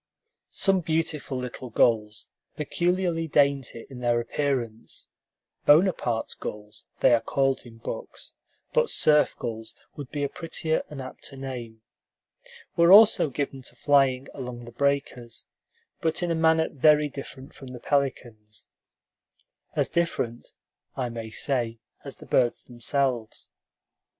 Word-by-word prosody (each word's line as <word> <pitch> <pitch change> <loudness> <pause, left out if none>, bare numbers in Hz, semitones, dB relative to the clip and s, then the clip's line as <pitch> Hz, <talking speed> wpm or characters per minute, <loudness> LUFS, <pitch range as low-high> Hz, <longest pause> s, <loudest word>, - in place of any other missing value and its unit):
Some 195 -1 +2
beautiful 160 -4 -2
little 125 0 -6
gulls, 110 -2 +1 0.3
peculiarly 170 +2 0
dainty 140 -5 +1
in 130 -2 -10
their 120 -1 +2
appearance 120 -2 -3 0.6
("Bonaparte's 145 - +3
gulls," 105 0 -8
they - - +6
are 115 - +4
called 135 -2 0
in 115 -1 -14
books, - - -7 0.4
but 485 -1 +3
"surf 150 -1 +3
gulls" 110 -1 -6 0.2
would 140 -4 -8
be 145 -1 -3
a - - +1
prettier 160 0 -2
and 140 -3 -7
apter 130 +1 -10
name), 120 -4 -7 0.9
were 170 0 +5
also 205 -6 +8
given 135 0 -4
to - - -8
flying 135 -2 +3
along 125 -3 -7
the 120 - -10
breakers, 130 -2 -2 0.6
but 160 +2 0
in 175 - 0
a - - +2
manner 160 0 +3
very 150 +2 +4
different 135 -1 -9
from 135 - -12
the 125 -1 -8
pelicans'; 120 -7 -2 1.1
as - - +2
different, 125 -9 -2 0.4
I 125 -2 -1
may 115 -1 -6
say, 120 -1 -1 0.3
as - - -7
the - - -14
birds 120 -2 +1
themselves. 120 -2 -2
135 Hz, 130 wpm, -26 LUFS, 120-150 Hz, 1.1 s, also